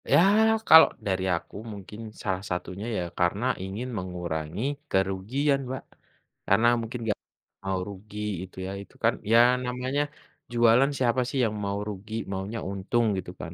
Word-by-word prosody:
Ya, -, -, +6 dB, 0.5 s
kalau 160 Hz, -, +10 dB, 0.2 s
dari 95 Hz, -1 st, 0 dB
aku, 85 Hz, -, -7 dB, 0.2 s
mungkin 105 Hz, +1 st, -10 dB, 0.2 s
salah 95 Hz, -3 st, -1 dB
satunya 90 Hz, +3 st, -4 dB
ya, -, -, 0 dB, 0.2 s
karena 95 Hz, +6 st, +1 dB, 0.2 s
ingin 100 Hz, +6 st, -4 dB
mengurangi 90 Hz, -1 st, -4 dB, 0.3 s
kerugian, 100 Hz, +10 st, +1 dB
Mbak. 130 Hz, 0 st, -4 dB, 0.6 s
Karena 110 Hz, +5 st, +4 dB
mungkin 115 Hz, +2 st, -5 dB
enggak 110 Hz, -2 st, -1 dB, 0.5 s
mau 95 Hz, -1 st, 0 dB
rugi 105 Hz, +1 st, -9 dB, 0.2 s
itu 95 Hz, -, -12 dB
ya. 95 Hz, -, -4 dB
Itu -, -, -21 dB
kan, -, -, +4 dB, 0.2 s
ya 115 Hz, -, +7 dB, 0.3 s
namanya 125 Hz, +3 st, -1 dB, 0.5 s
jualan 120 Hz, +4 st, +5 dB
siapa 125 Hz, -1 st, +2 dB
sih 140 Hz, -, -3 dB
yang 110 Hz, -1 st, -2 dB
mau 100 Hz, 0 st, -1 dB
rugi, 105 Hz, +2 st, -8 dB, 0.2 s
maunya 100 Hz, +4 st, -3 dB
untung 100 Hz, +5 st, 0 dB
gitu 90 Hz, -1 st, -5 dB
kan. 85 Hz, -, -6 dB
100 Hz, 150 wpm, -27 LUFS, 95-120 Hz, 0.6 s, kalau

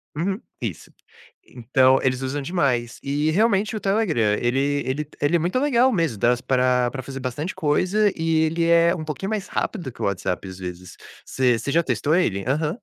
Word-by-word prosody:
Uhum, 190 Hz, +6 st, -1 dB, 0.2 s
isso. 110 Hz, -9 st, -5 dB, 0.5 s
Então 130 Hz, +2 st, +2 dB
eles 130 Hz, 0 st, 0 dB
usam 135 Hz, +2 st, -3 dB
demais. 135 Hz, -7 st, -1 dB
E 145 Hz, +3 st, 0 dB
realmente 210 Hz, +2 st, +2 dB
o 215 Hz, -, -2 dB
Telegram 195 Hz, -, 0 dB, 0.2 s
ele 120 Hz, +2 st, 0 dB, 0.3 s
ele 140 Hz, +3 st, -2 dB
ele 145 Hz, +4 st, +2 dB
é -, -, -2 dB
muito 180 Hz, +10 st, 0 dB
legal 260 Hz, -2 st, +3 dB
mesmo, 165 Hz, -, -1 dB
dá 120 Hz, -, +3 dB
s 125 Hz, -, -5 dB
para 125 Hz, -1 st, +2 dB
para 130 Hz, -, -5 dB
fazer 135 Hz, +1 st, -7 dB
bastante 140 Hz, +7 st, -4 dB
coisa 185 Hz, +7 st, +2 dB
e 160 Hz, -1 st, +1 dB
ele 165 Hz, +1 st, 0 dB
é 170 Hz, 0 st, +5 dB
um 160 Hz, -, -5 dB
pouquinho 160 Hz, +7 st, -4 dB
mais 210 Hz, -3 st, -3 dB
rápido 170 Hz, -, -3 dB
que -, -, -14 dB
o -, -, +1 dB
WhatsApp, 95 Hz, -1 st, -2 dB
às 95 Hz, 0 st, -9 dB
vezes. 90 Hz, 0 st, -8 dB, 0.3 s
Você 125 Hz, -3 st, +1 dB
você 140 Hz, +5 st, -4 dB
já 170 Hz, -, +3 dB
testou 135 Hz, +3 st, 0 dB
ele? 100 Hz, -, +1 dB
Aham. 150 Hz, +4 st, 0 dB
145 Hz, 195 wpm, -23 LUFS, 125-175 Hz, 0.5 s, é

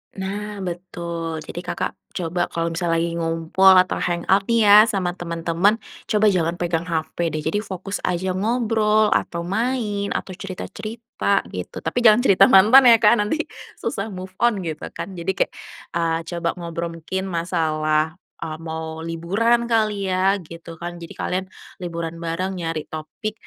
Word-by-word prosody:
Nah 200 Hz, +1 st, -5 dB
betul, 170 Hz, -2 st, -5 dB
jadi 170 Hz, -, -7 dB
Kakak 180 Hz, -, -3 dB, 0.3 s
coba 175 Hz, 0 st, -1 dB
kalau 165 Hz, 0 st, -2 dB
misalnya 170 Hz, -1 st, 0 dB
lagi 170 Hz, 0 st, 0 dB
ngumpul 165 Hz, +3 st, +3 dB
atau 185 Hz, 0 st, +3 dB
hangout 180 Hz, +3 st, +1 dB
nih 230 Hz, -1 st, +4 dB
ya 205 Hz, 0 st, +9 dB
sama 185 Hz, -4 st, -1 dB
teman-teman 170 Hz, +3 st, 0 dB, 0.3 s
coba 215 Hz, 0 st, +3 dB
jangan 170 Hz, -1 st, 0 dB
pegang 170 Hz, -2 st, -1 dB
HP 165 Hz, +1 st, -1 dB
deh 155 Hz, 0 st, -3 dB
jadi 165 Hz, +6 st, +1 dB
fokus 195 Hz, -1 st, -5 dB
aja 180 Hz, +1 st, -1 dB
ngobrol, 215 Hz, 0 st, +2 dB
atau 170 Hz, 0 st, -1 dB
main, 210 Hz, +1 st, -1 dB
atau -, -, -3 dB
cerita-cerita, 215 Hz, +4 st, -3 dB
gitu -, -, -6 dB
tapi 245 Hz, -, -1 dB
jangan 235 Hz, +1 st, +6 dB
cerita 195 Hz, -5 st, +6 dB
mantan 225 Hz, +7 st, +8 dB
ya 230 Hz, -, +8 dB
Kak 220 Hz, +2 st, +6 dB
nanti 210 Hz, +9 st, 0 dB, 0.4 s
susah 200 Hz, -4 st, -3 dB
move 185 Hz, -1 st, -7 dB
on 230 Hz, -5 st, +2 dB
gitu 160 Hz, -2 st, -5 dB
kan, 195 Hz, -, -5 dB
jadi 175 Hz, +1 st, -2 dB
kayak, -, -, +1 dB, 0.4 s
eee, 165 Hz, -1 st, 0 dB
coba 170 Hz, 0 st, -2 dB
ngobrol 170 Hz, -1 st, -4 dB
mungkin 190 Hz, +4 st, -4 dB
masalah 160 Hz, -3 st, 0 dB, 0.2 s
e -, -, -6 dB, 0.2 s
mau 160 Hz, 0 st, -5 dB
liburan 195 Hz, +9 st, +1 dB
kali 215 Hz, -4 st, +1 dB
ya 190 Hz, +2 st, +3 dB
gitu 165 Hz, 0 st, -10 dB
kan, 175 Hz, +1 st, -7 dB
jadi 165 Hz, -, -8 dB
kalian 185 Hz, +1 st, -2 dB, 0.4 s
liburan 170 Hz, -1 st, -5 dB
bareng 170 Hz, +3 st, -2 dB
nyari 165 Hz, -2 st, -3 dB
topik 160 Hz, +7 st, -6 dB
180 Hz, 155 wpm, -22 LUFS, 165-205 Hz, 0.4 s, ya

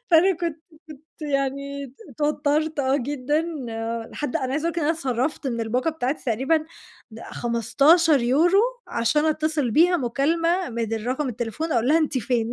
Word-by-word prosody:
فأنا 350 Hz, +2 st, +5 dB
كنت 335 Hz, -2 st, -2 dB, 0.6 s
كنت -, -, -8 dB
يعني 275 Hz, -1 st, -3 dB, 0.2 s
اتوترت، 300 Hz, +3 st, 0 dB
آه 265 Hz, 0 st, +2 dB
جدًا 290 Hz, +3 st, -1 dB, 0.7 s
لحد 290 Hz, -4 st, -2 dB
أنا 260 Hz, 0 st, -2 dB
عايزة 295 Hz, +3 st, -1 dB
اقول -, -, -2 dB
لِك 340 Hz, -, -3 dB
إن 300 Hz, -, -1 dB
أنا 320 Hz, -, +3 dB
اتْصَرَّفْتَ 270 Hz, -1 st, -2 dB
من 235 Hz, -3 st, -2 dB
الباقة 245 Hz, +7 st, 0 dB
بتاعتي 290 Hz, -2 st, -3 dB
تقريبًا، 265 Hz, +7 st, +1 dB, 0.6 s
د 225 Hz, -, -10 dB
15€ 285 Hz, -, +3 dB, 0.3 s
عشان 295 Hz, +6 st, +1 dB
أتصل 310 Hz, -4 st, 0 dB
بيها 350 Hz, +8 st, +4 dB
مكالمة 330 Hz, +5 st, 0 dB
من 225 Hz, -1 st, -3 dB
رقم 260 Hz, +2 st, -1 dB
التليفون، 240 Hz, +7 st, -3 dB
أقول 235 Hz, +1 st, +1 dB
لها: 315 Hz, +3 st, +5 dB
"أنتِ 300 Hz, -4 st, 0 dB
فين؟" 235 Hz, 0 st, -1 dB
280 Hz, 155 wpm, -24 LUFS, 245-315 Hz, 0.7 s, فأنا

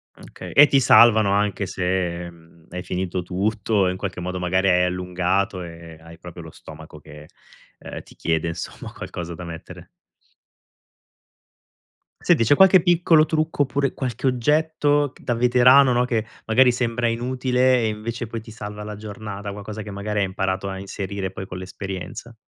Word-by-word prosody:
Okay -, -, -11 dB
e 150 Hz, +1 st, +8 dB
ti 140 Hz, -, +3 dB
salvano 110 Hz, -5 st, +6 dB
anche 100 Hz, 0 st, 0 dB
se, 90 Hz, -2 st, -2 dB
mhmm, 85 Hz, -1 st, -20 dB
hai 90 Hz, +1 st, -6 dB
finito 90 Hz, 0 st, -3 dB
tutto 100 Hz, +2 st, 0 dB
e -, -, +1 dB
in 90 Hz, -, -5 dB
qualche 95 Hz, -1 st, -5 dB
modo 90 Hz, +1 st, -4 dB
magari 95 Hz, +2 st, +1 dB
hai 90 Hz, 0 st, +3 dB
allungato 90 Hz, +1 st, -1 dB
e 85 Hz, -1 st, -11 dB
hai 85 Hz, +1 st, -14 dB
proprio 90 Hz, -1 st, -10 dB
lo 80 Hz, -, -11 dB
stomaco 80 Hz, 0 st, -13 dB
che, 75 Hz, +1 st, -13 dB, 0.5 s
uhm, -, -, -9 dB
ti -, -, -18 dB
chiede 80 Hz, 0 st, -1 dB
insomma 85 Hz, -, -7 dB
qualcosa 85 Hz, -1 st, -7 dB
da 90 Hz, -, -9 dB
mettere. 85 Hz, -1 st, -10 dB, 2.3 s
Senti 115 Hz, -, +3 dB
c'è 145 Hz, +6 st, +4 dB
qualche 190 Hz, 0 st, +6 dB
piccolo 165 Hz, -2 st, +4 dB
trucco 155 Hz, -1 st, 0 dB
oppure 140 Hz, 0 st, -1 dB
qualche 130 Hz, 0 st, -3 dB
oggetto 145 Hz, +2 st, +1 dB
ch -, -, -20 dB
da 120 Hz, -, -1 dB
veterano, 125 Hz, +3 st, +5 dB
no, 125 Hz, 0 st, +2 dB
che 115 Hz, -3 st, -1 dB, 0.2 s
magari 125 Hz, +3 st, +4 dB
sembra 120 Hz, -1 st, -1 dB
inutile 125 Hz, +2 st, +1 dB
e 110 Hz, -, +1 dB
invece 115 Hz, +2 st, -5 dB
poi 115 Hz, 0 st, -5 dB
ti 110 Hz, +1 st, -13 dB
salva 105 Hz, -1 st, -8 dB
la 105 Hz, 0 st, -7 dB
giornata, 105 Hz, -1 st, -7 dB
qualcosa 105 Hz, +2 st, -7 dB
che 105 Hz, -, -8 dB
magari 105 Hz, +1 st, -3 dB
hai 100 Hz, -, +2 dB
imparato 95 Hz, 0 st, -2 dB
a 95 Hz, 0 st, -6 dB
inserire 95 Hz, 0 st, -5 dB
poi 95 Hz, -, -7 dB
con 90 Hz, -, -7 dB
l'esperienza? 95 Hz, +5 st, -7 dB
100 Hz, 170 wpm, -22 LUFS, 90-120 Hz, 2.3 s, e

